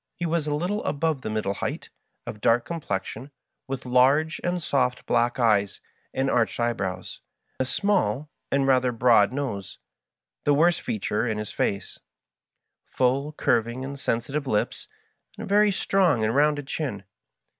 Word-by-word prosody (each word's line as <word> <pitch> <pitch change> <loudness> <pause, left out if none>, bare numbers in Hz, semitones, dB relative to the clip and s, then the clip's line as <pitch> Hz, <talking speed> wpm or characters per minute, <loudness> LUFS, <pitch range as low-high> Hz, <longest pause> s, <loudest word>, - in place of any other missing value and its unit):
He 175 - -3
was 165 -2 0
a 145 - 0
little 185 +7 -2
above 150 -1 -1
the 110 - -4
middle 105 -2 -1
height, - - -5 0.3
of 105 - -7
dark 115 +1 +3
complex 120 - -3
ion, 135 - -9 0.4
with 135 -1 -5
large 135 +6 +3
and 175 0 0
soft 130 -6 0
black 120 +1 +1
eyes 105 -5 +2 0.3
and 135 +1 -1
arched 120 -3 +1
eyebrows, 100 -6 -2 0.4
a 130 - +1
small 150 - 0 0.2
and 140 0 +2
rather 130 -2 +3
broad 115 -3 +4
nose 130 -9 -4 0.7
(the 145 - +3
worst 170 +4 +3
feature 105 +2 -1
in 110 -2 -1
his 105 -1 -5
face), 100 - -2 0.8
full, 135 +4 0
curviug 120 -2 0
and 140 +1 -6
sensitive 135 +5 -2
lips, 105 -4 -1 0.5
and - - -6
a - - -9
very 205 +1 +4
strong 185 - +2
and 110 +2 +1
rounded 145 0 +2
chin. 130 - -4
130 Hz, 155 wpm, -25 LUFS, 115-150 Hz, 0.8 s, broad